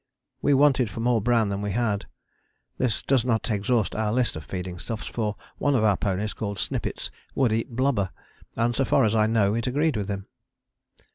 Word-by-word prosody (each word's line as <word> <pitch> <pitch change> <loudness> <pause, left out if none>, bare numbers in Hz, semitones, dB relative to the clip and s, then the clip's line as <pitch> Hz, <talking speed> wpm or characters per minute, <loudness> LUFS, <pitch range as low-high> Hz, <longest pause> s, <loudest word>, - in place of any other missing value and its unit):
We 145 0 +4
wanted 135 -4 +4
more 115 0 +2
bran 115 -1 +2
than 100 0 -2
we 105 -1 -2
had. 110 -4 0 0.7
This 125 -5 0
does 130 -4 +2
not 115 -1 0
exhaust 110 +2 +1
our 110 -1 0
list 125 +1 +1
of 80 - -6
feeding 90 +1 -5
stuffs, 115 +3 -5
for 105 -3 -2 0.2
one 145 -1 +2
of 115 - +2
our 105 -2 +4
ponies 100 +2 -1
called 100 -2 -4
Snippets - - -3 0.2
would 125 -5 +3
eat 115 +2 -2
blubber, 125 -7 +1 0.5
and 120 +1 +1
so 135 - +2
far - - +3
as 110 -1 +2
I 110 -1 +3
know 105 -3 +2
it 115 +3 -1
agreed 145 +3 +1
with 105 -2 -2
him. 100 -1 -3
110 Hz, 195 wpm, -25 LUFS, 100-125 Hz, 0.7 s, We